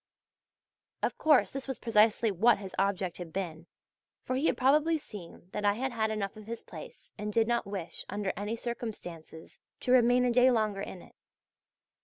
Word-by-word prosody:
Of - - -1
course 305 -4 +4
this 275 0 -5
was 265 - -3
precisely 220 0 +3
what 220 +6 +4
his 195 -2 -8
object 190 -3 0
had 175 -2 -7
been, 170 -2 -4 0.6
for 255 - -2
he 280 +5 +1
had - - +1
probably 300 +5 +4
seen 185 - -11
that 210 - -4
I 205 0 +4
had 260 +5 -2
had 220 -2 0
enough 205 -3 -3
of 215 0 -12
his 230 0 -5
place - - -11
and 210 0 -3
did 225 +1 +2
not 235 -3 0
wish 195 -4 -3
under 205 -1 -2
any 210 +4 -3
circumstances 205 -9 -7 0.2
to 250 - 0
remain 250 0 +5
a 245 - +3
day 250 +2 +6
longer 215 -5 +1
in 190 -2 -7
it. - - -18
215 Hz, 185 wpm, -30 LUFS, 195-245 Hz, 0.6 s, day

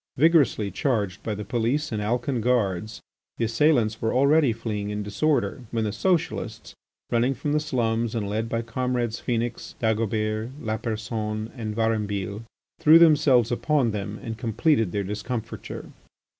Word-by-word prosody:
Vigorously 140 - +3
charged 105 -4 -1
by 110 - -3
the 105 0 -6
police 120 +6 0
and 110 -2 -2
Alcan 120 +3 -1
guards, 110 -3 0 0.4
the 115 - +1
assailants 115 -2 +2
were 110 +2 0
already 140 +1 +4
fleeing 110 -2 -3
in 105 0 -3
disorder, 135 +7 0
when 115 -1 -1
the 105 - -1
Socialists, 115 - -1 0.4
running 120 +3 +2
from 145 +4 -3
the 150 - +3
slums 120 -5 -1
and 105 -3 -1
led 110 +3 -2
by 115 0 -1
comrades 120 -1 -2
Phœnix, 120 0 -3
Dagobert, 110 0 0
Lapersonne, 110 -1 -3
and 110 -4 -4
Varambille, 105 -3 -1 0.4
threw 155 +2 +8
themselves 145 -8 +5
upon 130 -1 +1
them 105 0 -4
and 115 -2 -5
completed 115 - +1
their 100 +1 -1
discomfiture. 105 +4 -5
115 Hz, 145 wpm, -25 LUFS, 105-125 Hz, 0.4 s, threw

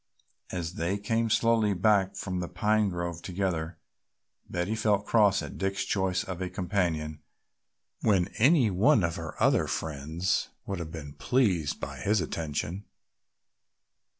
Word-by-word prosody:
As 85 -2 -4
they 90 +4 -1
came 115 +2 0
slowly 110 -2 +3
back 95 0 +3
from 90 -2 -3
the 90 - -3
pine 105 +3 +1
grove 85 -2 -4
together, 85 -3 -2 0.7
Betty 90 +4 -1
felt 105 -2 +1
cross 105 -4 +4
at - - -8
Dick's 95 0 -1
choice 95 -2 0
of 90 -1 -6
a 90 - -2
companion 85 -5 -1 0.8
when 95 -4 +2
any 130 -2 +5
one 100 +2 +4
of 85 -1 -1
her - - -6
other - - +3
friends 80 +4 -2 0.2
would 100 -2 -3
have 80 -2 -5
been 75 -4 -7
pleased 95 - +1
by - - -6
his 105 +1 +2
attention. 85 +3 -3
95 Hz, 140 wpm, -28 LUFS, 85-105 Hz, 0.8 s, any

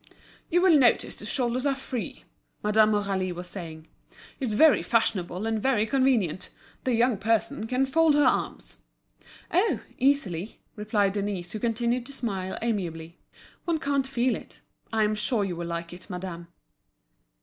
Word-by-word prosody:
"You 350 +2 +3
will 340 -6 +6
notice 240 -4 +3
the 210 - -8
shoulders 250 0 0
are 280 -1 +1
free," 260 -3 -6 0.4
Madame 215 +1 +4
Aurélie 195 -3 -1
was 180 +1 -7
saying. 160 -4 -8 0.5
"It's 250 -6 -1
very 305 +6 +6
fashionable 195 -4 0
and 225 -1 -1
very 235 -4 +2
convenient. 240 - +1 0.4
The 255 -2 +2
young 235 -2 +2
person 225 +4 0
can 255 +3 +1
fold 315 +2 +3
her 295 - +4
arms." - - -1 0.7
"Oh! 360 - +2 0.2
easily," 225 - 0 0.2
replied 210 -2 +1
Denise, 200 -4 -3
who 215 - -4
continued 235 +2 0
to 280 - -8
smile 195 -8 -3
amiably. 170 -7 -3 0.5
"One 335 -2 +1
can't 280 -3 0
feel 255 -1 +1
it. - - -11 0.3
I 220 -1 +2
am 210 0 +2
sure 215 +1 +1
you 185 -3 -3
will 170 0 -5
like 170 0 -4
it, 185 +3 -11
madame." 180 -2 -6
220 Hz, 155 wpm, -27 LUFS, 190-260 Hz, 0.7 s, will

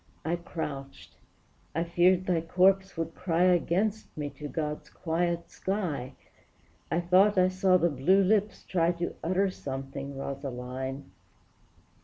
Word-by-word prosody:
I 165 +2 +1
crouched; 145 -5 -6 0.6
I 165 - +1
feared 180 +2 +3
thy 175 -3 +1
corpse 190 +2 +2
would 165 0 -3
cry 175 -1 0
Against 185 +4 +1
me 145 -1 -3
to 150 - -7
God's 150 0 -4
quiet 170 0 -2
sky, 175 -10 -3 0.8
I 165 - +1
thought 190 +4 +4
I 185 0 +5
saw 185 0 +3
the 175 -1 +2
blue 175 +9 +3
lips 210 +2 +1
try 170 -1 +1
To 170 0 -3
utter 185 +3 +1
something, 135 -2 -6
Rosaline! 135 0 -5
170 Hz, 130 wpm, -29 LUFS, 145-185 Hz, 0.8 s, I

